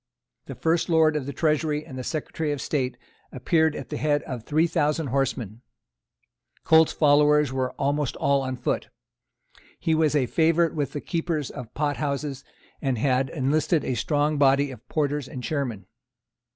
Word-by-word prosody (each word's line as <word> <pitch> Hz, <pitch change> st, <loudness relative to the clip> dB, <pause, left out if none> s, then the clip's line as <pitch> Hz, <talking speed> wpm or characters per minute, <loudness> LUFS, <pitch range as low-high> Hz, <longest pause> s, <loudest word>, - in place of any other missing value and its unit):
The -, -, -7 dB
first 165 Hz, +2 st, 0 dB
Lord 160 Hz, -2 st, +4 dB
of 140 Hz, -3 st, -2 dB
the -, -, -3 dB
Treasury 150 Hz, +1 st, 0 dB
and 135 Hz, -, -10 dB
the 130 Hz, -, -5 dB
Secretary 155 Hz, +1 st, -3 dB
of 145 Hz, -, -3 dB
State 130 Hz, -4 st, -2 dB, 0.3 s
appeared 160 Hz, -2 st, +1 dB
at -, -, -7 dB
the 150 Hz, -, -4 dB
head 145 Hz, -1 st, +1 dB
of 125 Hz, -3 st, -6 dB
three 155 Hz, +6 st, +2 dB
thousand 155 Hz, -3 st, 0 dB
horsemen. 125 Hz, -5 st, -2 dB, 1.0 s
Colt's 160 Hz, 0 st, +5 dB
followers 150 Hz, -2 st, +4 dB
were 130 Hz, -1 st, -1 dB
almost 145 Hz, 0 st, -1 dB
all 140 Hz, 0 st, +2 dB
on 130 Hz, -1 st, -3 dB
foot. 125 Hz, -, -2 dB, 0.9 s
He 160 Hz, -, +1 dB
was 155 Hz, -1 st, +2 dB
a 140 Hz, -3 st, +3 dB
favourite 165 Hz, +5 st, +2 dB
with 145 Hz, -3 st, -2 dB
the 145 Hz, -, -4 dB
keepers 165 Hz, -4 st, -2 dB
of 120 Hz, -2 st, -8 dB
pot 145 Hz, -1 st, -1 dB
houses, 140 Hz, -2 st, -3 dB, 0.4 s
and 135 Hz, -4 st, 0 dB
had 130 Hz, +2 st, +1 dB
enlisted 150 Hz, +3 st, 0 dB
a -, -, -1 dB
strong 145 Hz, +4 st, 0 dB
body 140 Hz, 0 st, +4 dB
of 125 Hz, 0 st, -13 dB
porters 145 Hz, -2 st, -1 dB
and 130 Hz, -1 st, -7 dB
chairmen. 125 Hz, -11 st, -3 dB
145 Hz, 165 wpm, -25 LUFS, 135-155 Hz, 1.0 s, Colt's